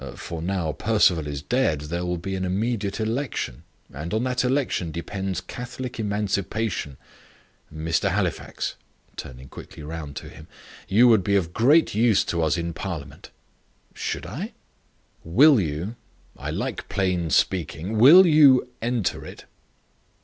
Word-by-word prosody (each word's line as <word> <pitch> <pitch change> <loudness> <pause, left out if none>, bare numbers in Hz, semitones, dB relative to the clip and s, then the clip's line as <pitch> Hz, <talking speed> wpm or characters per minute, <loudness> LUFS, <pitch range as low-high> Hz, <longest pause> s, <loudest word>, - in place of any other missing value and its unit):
For 85 -2 -6
now 90 -2 -1
Perceval 95 -6 +2
is 70 -1 -5
dead 120 - +1
there 85 +4 -4
will 90 0 -2
be 95 +3 -5
an 95 - -3
immediate 100 +2 -1
election; 115 - -3 0.3
and 80 +8 -4
on 110 - 0
that 125 -1 0
election 125 - 0
depends 95 +3 -4
Catholic 125 +4 -7
Emancipation. 100 -6 -2 0.7
Mr. 80 +1 0
Halifax," - - -2 0.4
turning 65 +1 -9
quickly 75 - -11
round 75 -2 -7
to - - -7
him, - - -13 0.4
"you 110 +6 +5
would 110 -5 +5
be 100 +2 +1
of 90 -3 0
great 145 - +4
use 110 -1 +3
to 85 - -1
us 80 +2 +1
in 85 0 -3
parliament." 80 -6 -7 0.6
"Should - - -4
I?" - - -6 0.7
"Will 130 - +6
you 85 +8 -4 0.4
I - - -6
like - - -4
plain 95 -4 0
speaking 90 +6 0
will 165 +11 +9
you 145 -6 +6
enter 120 -4 -1
it?" - - -11
95 Hz, 140 wpm, -24 LUFS, 80-115 Hz, 0.7 s, will